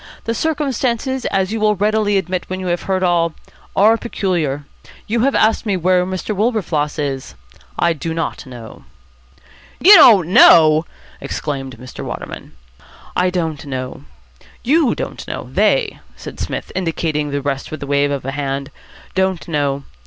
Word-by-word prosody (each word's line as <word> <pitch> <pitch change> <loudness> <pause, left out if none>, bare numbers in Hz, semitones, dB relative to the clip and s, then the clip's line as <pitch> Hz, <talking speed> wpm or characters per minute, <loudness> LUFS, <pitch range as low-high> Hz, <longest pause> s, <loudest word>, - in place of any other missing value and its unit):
The 230 - -2
circumstances, 265 -3 -1
as 190 0 0
you 225 - -2
will 210 0 +2
readily 210 0 +1
admit 185 -1 -2
when 185 0 -4
you 185 - -5
have 175 - -3
heard 190 -1 +1
all, 170 -2 +1 0.4
are 220 +3 +5
peculiar. 170 - -2 0.4
You 230 +2 -1
have 270 +4 +2
asked 220 +1 +3
me 205 -4 0
where 180 +1 +2
Mr. 190 +3 -3
Wilberfloss 190 -10 -1
is. 140 -3 -4 0.4
I 170 -1 +2
do 165 +1 -5
not 165 -3 -4
know." 120 -3 -11 1.0
"You 395 - +8
don't 215 - +8
know!" 160 -3 +6 0.3
exclaimed 135 -4 -5
Mr. 130 +2 -9
Waterman. - - -7 0.6
"I 180 0 +2
don't 165 -5 -3
know. 130 -2 -6 0.6
You 290 0 +3
don't - - -6
know. - - -6
They," 460 -4 +1 0.2
said - - -10
Psmith, - - -4
indicating 160 -4 -2
the 140 0 -2
rest 135 -1 -3
with 155 -2 -6
a - - -4
wave 140 0 +1
of 140 -1 -3
the 135 - -3
hand, 140 -1 -3 0.4
"don't 190 -2 -1
know. 140 -3 -1
180 Hz, 155 wpm, -18 LUFS, 145-215 Hz, 1.0 s, You